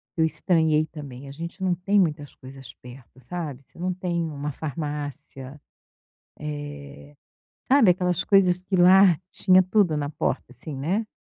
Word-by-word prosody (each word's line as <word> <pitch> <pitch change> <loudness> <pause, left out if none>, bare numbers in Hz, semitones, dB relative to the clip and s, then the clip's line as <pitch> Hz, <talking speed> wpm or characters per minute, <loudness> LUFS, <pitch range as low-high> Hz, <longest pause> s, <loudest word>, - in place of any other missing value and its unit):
que 165 - -1
eu - - +5
estranhei 160 -1 +2
também. 140 -4 -10
A - - -9
gente 170 +6 -8
não 185 -1 +2
tem 195 +4 +1
muitas 150 -5 -1
coisas 135 +1 -12
perto, 125 0 -14
sabe. 140 0 -6
Você - - -19
não 180 +1 -1
tem 175 -2 -2
uma 145 0 -5
farmácia, 145 -2 -6 0.8
eh, 145 -1 -8 0.5
sabe 265 -7 +5
aquelas 180 0 0
coisas 180 -3 +4
que 190 +1 -2
lá, 185 -1 +6
tinha 185 -1 +4
tudo 185 -3 +1
na 145 -1 -2
porta - - -2
assim, 135 +4 -8
né. 185 +11 -1
155 Hz, 155 wpm, -24 LUFS, 145-180 Hz, 0.8 s, lá